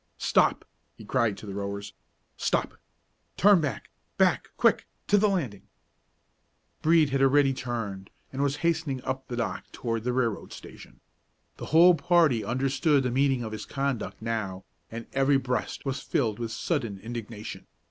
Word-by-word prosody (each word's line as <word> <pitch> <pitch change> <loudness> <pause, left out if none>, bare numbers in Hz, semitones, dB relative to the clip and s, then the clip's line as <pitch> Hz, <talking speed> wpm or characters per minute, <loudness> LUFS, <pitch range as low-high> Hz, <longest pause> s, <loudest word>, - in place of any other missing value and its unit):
"Stop!" - - +2 0.3
he 110 - -12
cried 115 -3 +1
to 105 - -10
the 100 - -6
rowers; 100 0 -5 0.4
"stop! - - 0 0.6
turn 200 -3 +6
back 145 -3 -4 0.3
back - - +2
quick - - +3 0.2
to 205 - +3
the 205 +1 +4
landing!" 135 - -3 1.1
Brede 155 -3 +4
had 135 0 +1
already 135 0 +4
turned, 115 -7 -5 0.2
and 135 - -2
was 140 0 +1
hastening 160 -6 0
up 130 0 -4
the 120 - -4
dock 120 -2 -4
toward 115 -2 -3
the 125 - 0
railroad 120 -5 -1
station. - - -13 0.6
The - - -7
whole 170 +3 +7
party 160 -7 +3
understood 135 - +1
the 125 - -1
meaning 135 -1 +2
of 110 - -5
his 110 - -6
conduct 135 -4 -3
now, 100 -5 -3 0.2
and 115 +1 -7
every 135 +1 +3
breast 125 +1 -3
was 135 -1 -2
filled 110 -5 -1
with 115 -1 -3
sudden 115 - -2
indignation. 110 0 -7
130 Hz, 155 wpm, -27 LUFS, 110-140 Hz, 1.1 s, whole